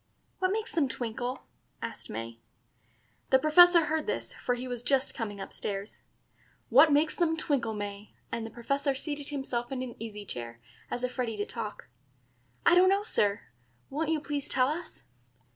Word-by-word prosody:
"What 370 0 +2
makes 435 +2 -2
them 310 -5 +3
twinkle?" 245 +1 -4 0.4
asked - - -6
May. 115 +1 -6 0.9
The 265 - +7
Professor 340 +3 +7
heard 310 0 -1
this, - - -2
for 245 - -1
he 250 +1 -5
was 245 -2 -4
just 265 +2 +1
coming 205 -4 -4
up 195 - -6
stairs. 200 +1 -5 0.6
"What 315 - +7
makes 300 +2 +3
them 325 -2 +1
twinkle, 250 -8 0
May?" 205 0 -6 0.2
and 230 - -2
the 225 - -5
Professor 275 +5 -1
seated 290 +1 -5
himself 265 -4 -3
in 260 -1 -2
an 245 -2 -6
easy 210 -2 -6
chair, 120 -7 -6 0.3
as 245 - -3
if 250 +1 -3
ready 230 -3 -1
to 205 - -1
talk. 220 -3 -6 0.8
"I - - +7
don't 365 +1 +7
know, 395 +1 +3
Sir. 205 - +2 0.5
Won't 305 +3 -1
you 320 -1 +2
please 290 -2 -3
tell 255 0 +3
us?" 320 +2 -5
255 Hz, 175 wpm, -30 LUFS, 225-305 Hz, 0.9 s, The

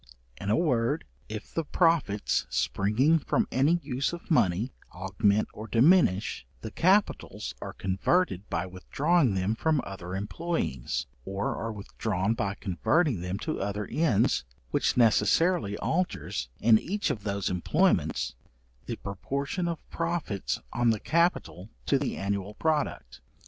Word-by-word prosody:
In 100 - -5
a 105 - +4
word, 145 -3 +1 0.3
if 110 0 -7
the 165 - 0
profits, 160 - +1
springing 125 +12 +2
from - - 0
an 135 +2 +3 0.2
use 140 +2 -1
of 170 0 -8
money, 105 - +2 0.2
augment 100 +3 +1
or 110 +1 -8
diminish, 115 - +3 0.2
the 110 - -6
capitals 195 - +1
are - - -6
converted 95 - 0
by - - -1
withdrawing 130 - +1
them 95 +3 +1
from 155 +6 +1
other 95 -2 -6
employings, 100 - -2 0.2
or 95 +8 -2
are 115 - -3
withdrawn 100 -1 -2
by 100 -4 -2
converting 110 - +1
them 90 +2 -3
to 155 +8 -3
other 100 +1 -2
ends, 150 - +2 0.3
which - - +1
necessarily 115 - +3
alters, 175 - -2
in 110 -1 +6
each 200 - -1
of 115 -7 -4
those 100 -2 -2
employments, 90 -1 +1 0.5
the - - -2
proportion 140 - -3
of 170 -2 -5
profits 165 - -2
on 120 0 +2
the 110 -2 +2
capital 110 - 0 0.2
to - - +2
the - - -2
annual 100 +1 -3
product. 150 - -1
110 Hz, 135 wpm, -28 LUFS, 100-160 Hz, 0.5 s, in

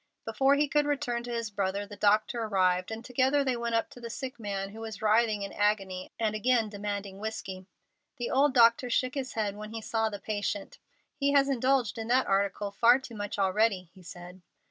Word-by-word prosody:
Before 275 +1 +3
he 295 +1 +2
could 295 0 +1
return 245 -5 -1
to 245 - -6
his 230 -2 -3
brother 200 0 -2
the 205 0 -10
doctor 215 +3 +2
arrived, 185 -4 +1
and 225 +1 -6
together 265 +3 +2
they 260 -2 0
went 235 -1 -2
up 225 - +1
to - - -12
the 235 - -6
sick 255 +1 -6
man, 195 -2 -3
who 215 +3 -11
was 220 -3 -7
writhing 215 -1 +2
in 200 - -6
agony, 195 -3 -1
and 220 -2 0
again 225 0 +2
demanding 205 -1 -5
whiskey. 195 -3 -6 0.5
The 240 - -3
old 275 0 +3
doctor 235 +1 +5
shook 255 +1 +1
his 270 -2 -4
head 210 -3 -1
when 210 0 -8
he 225 0 -6
saw 225 0 0
the 205 - -6
patient. 205 -1 -4 0.3
"He 280 0 0
has 280 -1 +4
indulged 255 -3 +1
in 225 - -4
that 255 +2 +3
article 200 +1 0
far 235 +4 +5
too 260 -3 -10
much 205 -2 -5
already," 195 -2 +1
he 190 - -16
said. 180 +1 -11
220 Hz, 210 wpm, -29 LUFS, 200-245 Hz, 0.5 s, doctor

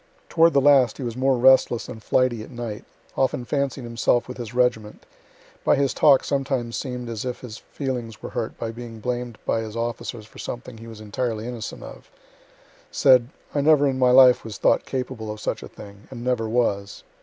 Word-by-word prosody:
Toward 165 +1 +4
the 140 - +4
last 135 -5 +5
he - - -6
was 120 -2 -4
more 130 0 +2
restless 130 -2 +4
and 110 - -9
flighty 120 0 +1
at - - -10
night 120 -4 -6 0.3
often 130 -2 0
fancied 140 0 -2
himself 120 0 0
with 125 - -8
his 120 -3 -6
regiment 120 -4 -1 0.6
by - - +4
his 140 -2 +1
talk 140 -3 +5
sometimes 135 -4 -2
seem'd 125 -3 -5
as 115 -2 -5
if 125 -1 -5
his 115 -4 -9
feelings 125 -6 -5
were - - -8
hurt 120 -3 -4
by 115 -1 -4
being 115 -1 -9
blamed 120 0 -4
by 115 - 0
his 110 -1 -7
officers 115 -1 -4
for 110 - -16
something 120 -1 -7
he 115 - -11
was 110 -2 -10
entirely 110 +1 -3
innocent 120 -4 -6
of - - -12 0.8
said, 130 -3 +4 0.2
"I 145 - +1
never 145 -1 +4
in 130 -1 -1
my 125 -1 +4
life 125 0 +7
was 110 -3 -7
thought - - +2
capable 125 -4 -4
of 105 - -7
such - - -3
a - - -8
thing, 100 -1 -13
and 120 -3 -8
never 120 -3 -1
was." 100 -4 -1
120 Hz, 200 wpm, -23 LUFS, 115-130 Hz, 0.8 s, life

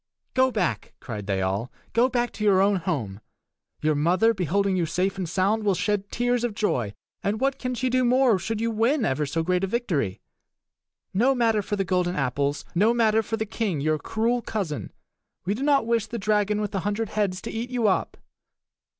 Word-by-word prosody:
"Go 260 0 +4
back!" 205 -9 -2
cried 105 -5 -6
they 95 -2 0
all; 100 +6 -2 0.2
"go 240 +3 +4
back 240 -1 0
to 215 - -6
your 200 -3 +5
own 200 +1 +3
home! 115 - -3 0.6
Your 155 0 +3
mother, 180 +10 +3
beholding 195 +1 0
you 175 -3 0
safe 185 +4 0
and 180 -3 -3
sound, 200 +5 +1
will 200 -2 +2
shed 200 +2 -1
tears 245 0 0
of 235 -4 -1
joy; 120 - -1 0.3
and 210 +2 -1
what 270 +1 0
can 250 0 -2
she 255 +2 -1
do 255 0 +2
more 250 -4 +4
should 220 +4 -3
you 230 +1 0
win 230 +4 +2
ever 145 +2 0
so 165 +4 -1
great 180 +2 0
a - - +1
victory? 175 - -1 0.9
No 250 +8 +3
matter 225 -3 +2
for 205 +1 -3
the 195 -1 -1
golden 180 -1 0
apples! 140 +2 -1
No 210 +7 +3
matter 225 -2 +3
for 225 +1 -3
the 220 - -2
king, 210 -6 -2
your 155 +2 +1
cruel 230 +8 0
cousin! 190 -11 -4 0.5
We 195 - +1
do 225 - -5
not 280 -3 +3
wish 230 -2 +1
the 235 - -5
dragon 210 0 +1
with 210 - -2
the 195 - -1
hundred 205 +3 -2
heads 200 -4 -1
to - - -5
eat 230 +2 -4
you 245 -3 +1
up." 190 - 0
205 Hz, 205 wpm, -25 LUFS, 175-230 Hz, 0.9 s, your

